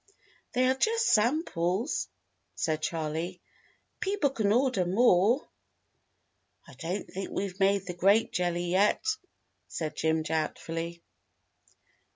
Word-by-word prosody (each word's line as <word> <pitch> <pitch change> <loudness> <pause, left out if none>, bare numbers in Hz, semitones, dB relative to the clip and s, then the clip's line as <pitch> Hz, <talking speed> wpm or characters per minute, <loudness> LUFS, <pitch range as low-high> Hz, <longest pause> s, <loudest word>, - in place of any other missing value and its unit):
"They 255 +1 +3
are 260 - +4
just 455 - +1
samples," 220 - +1 0.5
said 155 -1 -1
Charley. 160 +3 -3 0.6
"People 385 -8 0
can 215 -6 0
order 250 -4 +2
more." 205 +5 +3 1.2
"I - - -13
don't 180 +5 -4
think 195 +1 -6
we've 195 -1 -4
made 195 0 +3
the 180 - -4
grape 195 +6 +3
jelly 175 -1 0
yet," 200 - +2 0.6
said 155 -2 -4
Jim 160 0 +1
doubtfully. 165 +2 -3
190 Hz, 110 wpm, -29 LUFS, 170-235 Hz, 1.2 s, are